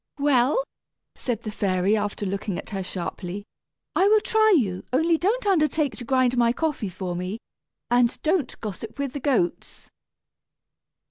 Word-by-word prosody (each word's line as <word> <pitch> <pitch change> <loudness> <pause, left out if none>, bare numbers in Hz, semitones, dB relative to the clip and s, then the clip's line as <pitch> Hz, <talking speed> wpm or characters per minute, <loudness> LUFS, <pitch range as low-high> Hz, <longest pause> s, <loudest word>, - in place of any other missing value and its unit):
"Well," 285 - +3 0.5
said 235 -3 -3
the 215 - -4
fairy, 195 0 +1
after 205 -1 -2
looking 195 -1 -3
at - - -7
her 195 -2 -2
sharply, 185 +1 -5 0.5
"I 385 - +4
will 430 +1 +6
try 435 -2 +4
you; 190 -8 -1
only 320 +6 +3
don't 420 +9 0
undertake 305 -6 +2
to - - -6
grind 255 0 +2
my 235 -1 +4
coffee 295 -8 -1
for 180 -1 -4
me, 180 +4 -3 0.5
and 245 0 +3
don't 315 -5 0
gossip 220 +1 -6
with 280 -2 -3
the 285 - -3
goats." 245 -11 -1
245 Hz, 150 wpm, -25 LUFS, 200-305 Hz, 0.5 s, will